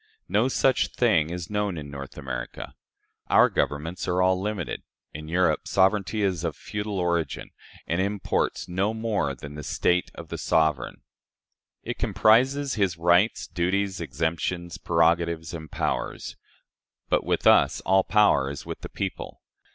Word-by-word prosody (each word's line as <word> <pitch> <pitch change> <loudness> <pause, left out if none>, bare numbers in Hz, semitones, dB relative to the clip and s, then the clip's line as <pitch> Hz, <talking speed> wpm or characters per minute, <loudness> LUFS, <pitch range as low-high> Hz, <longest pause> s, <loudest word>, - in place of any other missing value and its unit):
No 105 +6 +2
such 130 -1 +2
thing 100 -11 +3
is 90 0 -6
known 105 -3 -1
in 75 -2 -7
North 70 -1 -8
America. 65 -2 -6 0.5
Our - - +5
governments 80 +5 -2
are 90 0 +1
all 95 0 +3
limited. 105 0 -3 0.3
In 75 +1 -8
Europe 90 +3 +1
sovereignty 100 +2 +2
is 90 -4 0
of 80 -3 -2
feudal 105 -1 -5
origin, 85 -4 -1 0.3
and 85 +3 0
imports 100 0 -1
no 95 +5 -1
more 105 -11 -1
than 70 +3 -9
the 75 - -7
state 90 +5 +1
of - - -10
the - - -5
sovereign. 80 -4 0 0.8
It - - -5
comprises 130 +5 +3
his 95 -6 0
rights, 85 +6 +3
duties, 95 +3 -1
exemptions, 85 +2 -3
prerogatives, 85 0 +1
and 80 -2 -7
powers. - - -3 0.7
But - - +1
with - - -1
us - - +5
all 95 +1 +3
power 100 -12 +3
is 70 - -7
with - - -7
the - - -7
people. - - -5
90 Hz, 145 wpm, -26 LUFS, 80-100 Hz, 0.8 s, Our